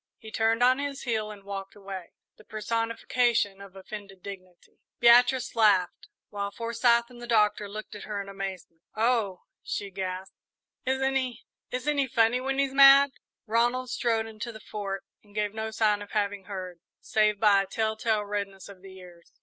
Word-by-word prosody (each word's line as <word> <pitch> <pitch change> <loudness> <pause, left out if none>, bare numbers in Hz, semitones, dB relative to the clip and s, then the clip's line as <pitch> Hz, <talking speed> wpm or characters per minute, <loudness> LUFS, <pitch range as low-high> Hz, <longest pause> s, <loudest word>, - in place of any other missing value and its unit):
He 220 - -11
turned 225 +2 +2
on 255 +2 +5
his 285 -1 -4
heel 220 -4 -1
and 205 -2 -10
walked 195 -1 -7
away, 195 -3 -8 0.2
the - - -18
personification 225 -1 0
of 195 -1 -12
offended 195 -1 -10
dignity. 185 -3 -11 0.2
Beatrice 245 +2 +5
laughed, 205 -5 +3 0.2
while 200 -1 -3
Forsyth 235 +2 +1
and 240 -1 -13
the 240 - -7
Doctor 210 -2 +2
looked 215 +1 -8
at 210 - -8
her 210 -1 -4
in 200 - -5
amazement. 190 -4 -7
"Oh," 220 -5 +1 0.2
she 200 -1 -4
gasped, 185 0 -5 0.5
"isn't 265 +1 +1
he 255 -2 -2 0.2
isn't 285 +4 -1
he 275 - +2
funny 230 +1 +2
when 270 +1 -2
he's 275 -1 +1
mad!" 275 0 +8 0.3
Ronald 240 +3 +1
strode 225 -2 0
into 225 +1 -6
the 220 - -11
Fort 200 -3 -5 0.2
and 205 -1 -22
gave 210 -1 -1
no 220 0 -3
sign 210 -1 +1
of 205 - -10
having 205 -2 -1
heard, 185 -3 -7 0.2
save 215 -1 +1
by 205 -3 +5
a 195 - -5
tell 220 +2 -1
tale 215 -1 0
redness 200 -2 -4
of 195 -2 -13
the 190 0 -12
ears. 175 -2 -15
215 Hz, 175 wpm, -28 LUFS, 195-235 Hz, 0.5 s, mad